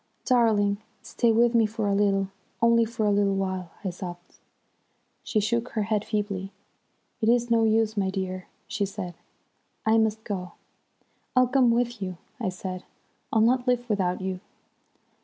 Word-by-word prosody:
"'Darling, 215 -5 +3 0.2
stay 235 -2 +1
with 235 +2 +4
me 230 -2 +4
for 215 -1 -2
a 200 - +2
little, 195 -1 +2 0.3
only 230 0 +4
for 225 -1 -2
a 205 - +3
little 200 -1 +2
while!' 190 -2 -2
I 190 - -1
sobbed. 175 0 -9 0.8
"She 215 - 0
shook 235 +3 0
her 215 - 0
head 210 0 0
feebly. 200 -3 -2 0.7
'It 220 - +3
is 240 0 +2
no 225 -1 +4
use, 220 0 +2
my 195 -2 +1
dear,' 185 -1 -4 0.2
she 210 - -2
said, 185 -2 -4 0.7
'I 220 +1 +4
must 220 0 +1
go.' 180 -5 -4 0.8
"'I'll 255 -1 +5
come 260 -2 +4
with 240 -1 0
you,' 185 -2 -4 0.2
I - - -1
said, 185 0 -6 0.5
'I'll 220 - +3
not 245 +3 +3
live 245 -1 +1
without 190 -4 0
you.' 185 -1 -3
210 Hz, 160 wpm, -26 LUFS, 190-230 Hz, 0.8 s, I'll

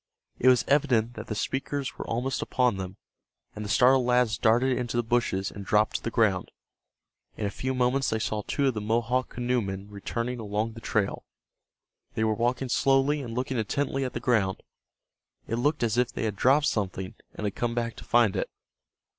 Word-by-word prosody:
It 130 - +2
was 125 -1 +5
evident 120 -5 +2
that 110 -1 -8
the 110 - -3
speakers 135 +4 -2
were - - -5
almost 125 +3 -1
upon 125 -5 +1
them, 95 0 -6 0.6
and 105 - -5
the 105 - -5
startled 125 +4 +5
lads 125 -2 +3
darted 125 +3 +3
into 120 -1 -2
the 120 - +2
bushes 115 -5 0
and 100 - -8
dropped 105 +2 +2
to - - -12
the - - -2
ground. 105 -6 +1 0.9
In 105 - -2
a 100 - -1
few 130 +3 -3
moments 125 +2 +2
they 110 - 0
saw 110 -1 -2
two 140 +7 -1
of - - -2
the 105 - -4
Mohawk 120 +4 0
canoemen 105 -5 -2
returning 115 +5 -3
along 110 +1 -2
the 115 - -10
trail. 110 -2 -1 0.9
They 110 - 0
were 110 -1 +2
walking 120 +4 0
slowly 135 +3 +3
and 115 -4 -6
looking 125 0 -1
intently 135 +4 -1
at 130 - -3
the - - -3
ground. 110 -6 +1 0.8
It 115 - -1
looked 145 +2 +1
as 115 0 +1
if 125 -1 +1
they - - -4
had 110 -3 -1
dropped 135 +8 +4
something, 95 -5 -2 0.2
and 105 - -4
had 100 - -1
come 120 -1 -2
back 115 -1 -2
to - - -9
find 120 -5 +3
it. - - -1
120 Hz, 195 wpm, -27 LUFS, 105-125 Hz, 0.9 s, was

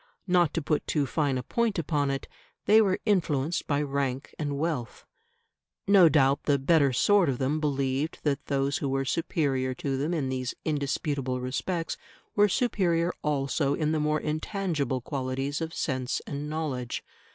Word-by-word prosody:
Not 180 -4 +3
to 165 - -1
put 150 0 0
too 150 -3 +1
fine 140 0 0
a 125 - -3
point 230 - 0
upon 145 -3 0
it, 135 0 -3 0.4
they 220 +1 +7
were 190 -3 +2
influenced 160 -6 +1
by 145 0 +1
rank 135 -2 -2
and 145 -2 -2
wealth. 145 -6 -3 0.8
No 195 -4 +7
doubt 140 -2 +3
the 145 -2 +3
better 140 0 +3
sort 190 +6 +4
of 130 - -1
them 140 +4 0
believed 140 0 -1
that 145 -2 -1
those 140 0 0
who 140 - -2
were 135 0 0
superior 135 -3 0
to 135 0 -2
them 145 +5 -1
in 150 -6 -1
these 130 -1 -3
indisputable 140 -3 -1
respects 165 +7 -2 0.4
were 205 0 +5
superior 180 -7 +1
also 140 -1 0
in 155 -1 0
the 160 - +1
more 150 0 +1
intangible 155 - -2
qualities 135 +2 -3
of 160 0 -3
sense 130 -5 -2
and 145 +1 -5
knowledge. 145 -6 -3
145 Hz, 165 wpm, -28 LUFS, 135-165 Hz, 0.8 s, they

